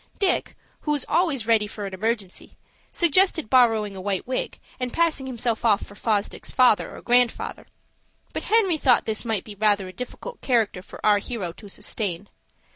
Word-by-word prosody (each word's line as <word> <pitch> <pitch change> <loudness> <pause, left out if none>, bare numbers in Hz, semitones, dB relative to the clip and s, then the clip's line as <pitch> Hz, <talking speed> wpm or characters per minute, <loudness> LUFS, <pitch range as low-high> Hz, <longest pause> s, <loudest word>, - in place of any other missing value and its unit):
Dick, 385 -3 +1 0.2
who 300 - -2
was 290 -3 -1
always 305 -10 +1
ready 220 -2 +3
for 205 -1 -6
an 195 - -6
emergency, 205 -1 -3 0.3
suggested 345 - +2
borrowing 225 -5 +4
a 190 - -7
white 195 -1 -2
wig, 255 +1 -3 0.2
and 250 -1 -2
passing 320 -4 0
himself 235 -2 -2
off 215 -3 +3
for - - -13
Fosdick's 210 0 -2
father 250 -4 +3
or - - -11
grandfather. 245 -1 +1 0.7
But - - -3
Henry 390 -8 +3
thought 255 -4 +4
this 220 +2 -2
might 220 -4 -1
be 210 - -10
rather 205 -2 +1
a 185 - -10
difficult 250 - -8
character 225 -7 +1
for - - -10
our 210 -1 +5
hero 200 -5 -4
to 205 +4 -13
sustain. 195 -2 -4
225 Hz, 175 wpm, -24 LUFS, 205-260 Hz, 0.7 s, our